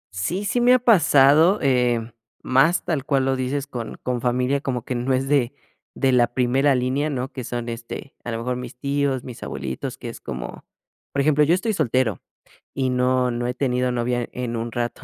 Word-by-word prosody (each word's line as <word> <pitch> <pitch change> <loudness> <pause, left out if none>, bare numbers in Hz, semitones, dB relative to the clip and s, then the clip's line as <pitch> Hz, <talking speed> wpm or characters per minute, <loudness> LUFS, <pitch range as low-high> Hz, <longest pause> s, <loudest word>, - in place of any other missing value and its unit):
Sí, 175 - -2
sí 240 +4 0
me 250 +1 +6
ha - - +3
pasado, 160 - +5
eh, 120 -3 +1 0.3
más 135 +7 +3
tal 155 -6 -1
cual 135 -2 +1
lo 135 0 +1
dices 135 +2 -2
con 120 -5 -6
con 125 -1 -2
familia, 125 +3 +1
como 125 -5 -3
que - - -3
no 125 +2 -1
es 130 +1 +1
de 135 -4 +2 0.4
de 135 - +2
la 120 -1 +4
primera 130 +3 +3
línea, 130 +4 0
¿no? 135 -1 -3
Que 130 - -6
son, 120 0 -4
este, 115 +3 -7
a 120 - -4
lo 115 - -2
mejor 125 +2 -2
mis 125 0 -7
tíos, 140 -1 -1
mis 125 -3 -9
abuelitos, 65 -1 -5
que - - -7
es - - -10
como 60 -1 -7 0.5
por 140 - +1
ejemplo, 150 +1 +3
yo 160 +4 +4
estoy 220 +4 -1
soltero, 125 - 0 0.5
y 130 -1 0
no 125 0 +2
no 120 0 -2
he 125 - -1
tenido 125 -1 0
novia 120 0 -1
en 125 -2 -4
un 115 +1 -3
rato, 120 +1 -3
130 Hz, 205 wpm, -23 LUFS, 120-140 Hz, 0.5 s, me